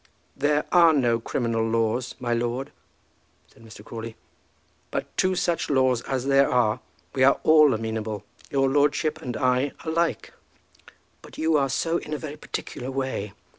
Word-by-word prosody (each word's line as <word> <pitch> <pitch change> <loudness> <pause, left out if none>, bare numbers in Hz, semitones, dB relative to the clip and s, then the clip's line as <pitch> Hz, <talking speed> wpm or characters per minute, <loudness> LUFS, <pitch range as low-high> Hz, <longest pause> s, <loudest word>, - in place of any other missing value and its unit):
"There 145 +2 +1
are 170 -2 +6
no 120 -5 +2
criminal 115 -1 -1
laws, 115 +2 0
my 120 -2 -1
lord," 120 +3 -2 0.8
said 115 - -19
Mr. 110 -1 -13
Crawley; 115 -1 -7 0.7
"but - - -5
to 185 0 +2
such 175 -1 -1
laws 130 -3 +2
as 130 -1 -2
there 140 0 +4
are 120 -4 +2 0.3
we 130 - +2
are 135 - +5
all 155 -2 +6
amenable, 110 -2 -3 0.2
your 135 -1 +2
lordship 145 +3 +1
and 125 -5 -4
I 130 +2 +1
alike." 165 +1 -1 0.9
"But - - -14
you 160 0 +1
are 140 -2 +2
so 165 +5 0
in 150 - -5
a - - -3
very 150 -1 -7
particular 130 -3 -6
way. 130 -7 -3
130 Hz, 155 wpm, -25 LUFS, 115-150 Hz, 0.9 s, are